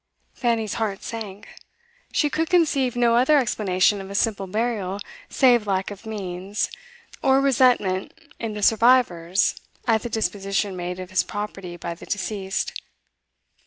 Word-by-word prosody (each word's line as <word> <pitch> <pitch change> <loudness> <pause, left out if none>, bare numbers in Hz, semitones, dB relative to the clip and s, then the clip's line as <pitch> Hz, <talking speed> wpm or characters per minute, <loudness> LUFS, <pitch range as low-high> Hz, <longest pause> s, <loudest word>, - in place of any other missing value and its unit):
Fanny's 230 -3 0
heart 205 -3 -2
sank. 210 -3 -7 0.6
She 300 - +2
could 325 +1 0
conceive 285 -8 +2
no 240 -1 +3
other 260 +5 +5
explanation 205 -5 +2
of 190 - -9
a 200 - -6
simple 200 -2 0
burial 205 -2 -2 0.3
save 240 -5 +4
lack 190 0 0
of 205 +2 -10
means, 195 -1 -3 0.5
or 265 0 +4
resentment 245 -8 +2 0.3
in 225 -2 -4
the 210 - -4
survivors 215 -6 +3 0.2
at 225 -2 +3
the 240 - -5
disposition 200 -2 -1
made 180 0 -4
of 185 0 -7
his 185 - +3
property 195 -4 -6
by 170 0 -5
the 170 - -13
deceased. 195 -1 -3
210 Hz, 140 wpm, -24 LUFS, 190-240 Hz, 0.6 s, other